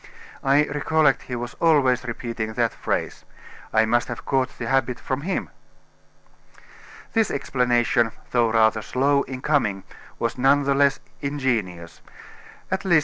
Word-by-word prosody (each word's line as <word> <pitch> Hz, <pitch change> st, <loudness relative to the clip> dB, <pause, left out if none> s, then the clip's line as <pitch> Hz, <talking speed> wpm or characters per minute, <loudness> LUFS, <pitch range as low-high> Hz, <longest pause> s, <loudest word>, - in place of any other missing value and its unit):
I 140 Hz, +2 st, +4 dB
recollect 150 Hz, -1 st, +1 dB
he 125 Hz, -, -2 dB
was 120 Hz, 0 st, -5 dB
always 135 Hz, -7 st, +3 dB
repeating 115 Hz, -2 st, -4 dB
that -, -, 0 dB
phrase. -, -, -3 dB, 0.5 s
I 110 Hz, 0 st, +4 dB
must 120 Hz, +2 st, +1 dB
have -, -, -7 dB
caught 130 Hz, -1 st, 0 dB
the 120 Hz, -, -5 dB
habit 130 Hz, 0 st, 0 dB
from 130 Hz, +1 st, -3 dB
him." 185 Hz, +5 st, -3 dB, 1.6 s
This 225 Hz, -2 st, +2 dB
explanation, 120 Hz, -3 st, +1 dB, 0.2 s
though 120 Hz, -2 st, +3 dB
rather 110 Hz, -1 st, +3 dB
slow 140 Hz, +5 st, +1 dB
in 130 Hz, -1 st, -7 dB
coming, 105 Hz, -11 st, +1 dB, 0.3 s
was 115 Hz, +1 st, -2 dB
none 140 Hz, +2 st, +4 dB
the 140 Hz, 0 st, +2 dB
less 140 Hz, 0 st, +3 dB, 0.2 s
ingenious. 115 Hz, -12 st, -2 dB, 0.7 s
At 190 Hz, +1 st, -1 dB
least, 185 Hz, -3 st, +3 dB
M. -, -, +7 dB
130 Hz, 145 wpm, -23 LUFS, 115-140 Hz, 1.6 s, M